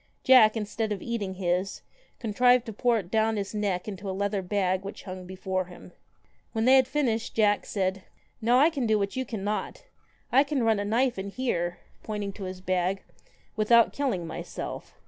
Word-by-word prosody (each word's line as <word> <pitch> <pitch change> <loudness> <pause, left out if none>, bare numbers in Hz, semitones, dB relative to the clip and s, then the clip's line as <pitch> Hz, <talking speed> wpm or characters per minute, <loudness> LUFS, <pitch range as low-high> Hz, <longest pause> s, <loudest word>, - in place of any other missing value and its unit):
Jack, 235 -4 +7
instead 215 +1 -2
of 200 -3 -3
eating 210 -5 -3
his, 185 +1 -1 0.3
contrived 245 +2 +3
to 225 - -6
pour 240 +2 +2
it 185 -4 -6
down 220 0 +2
his 200 0 -4
neck 200 -3 -1
into 200 -1 -5
a 190 - -3
leather 200 0 0
bag 185 0 0
which 200 - -8
hung 185 -1 -8
before 185 0 -2
him. 180 0 -13 0.6
When 225 -1 0
they 260 - +6
had 260 -2 +5
finished, 250 -5 -1
Jack 210 -2 +2
said 190 -1 -1 0.4
'Now 240 +3 +4
I 300 +5 +5
can 270 -7 -1
do 215 -1 +3
what 200 -1 -2
you 260 0 -2
cannot. 210 -2 -4 0.5
I 270 +2 +6
can 280 -3 -1
run 220 -2 +3
a 205 - -2
knife 235 +1 +1
in 195 +1 -4
here,' 175 -7 -2 0.2
pointing 205 -2 -4
to 195 -1 -7
his 185 0 -7
bag, 185 +1 0 0.3
' - - -33
without 230 +2 +4
killing 250 -12 -1
myself.' 165 - -7
210 Hz, 190 wpm, -27 LUFS, 190-235 Hz, 0.6 s, Jack